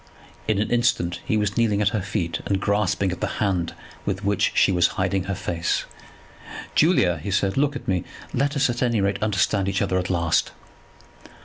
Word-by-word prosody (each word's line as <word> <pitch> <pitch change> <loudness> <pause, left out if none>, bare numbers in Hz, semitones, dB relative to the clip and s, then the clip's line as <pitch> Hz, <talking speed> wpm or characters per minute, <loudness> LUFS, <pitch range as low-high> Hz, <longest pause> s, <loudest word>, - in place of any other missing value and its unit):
In 110 -2 +2
an 105 - -1
instant 120 -8 +1
he 110 - +1
was 105 -1 0
kneeling 110 -3 +2
at 105 -2 +3
her 105 -3 -2
feet, 95 -4 -2
and 100 -1 +1
grasping 100 -2 +1
at 90 - -6
the - - -2
hand 90 -5 0 0.3
with 100 0 -3
which 100 0 +2
she - - +4
was 90 -2 +4
hiding 95 0 0
her 100 0 -2
face. 85 -1 -1 0.9
"Julia," 95 - +3
he 100 - -5
said, 100 0 +1
"look 145 +1 +1
at - - -7
me; 90 -3 0 0.3
let 140 +3 0
us 140 -1 +3
at 120 -1 -3
any 120 -3 +2
rate 100 0 0
understand 100 -1 +1
each 95 - 0
other 95 -2 0
at 90 - -3
last." 85 -3 +1
100 Hz, 195 wpm, -23 LUFS, 95-110 Hz, 0.9 s, she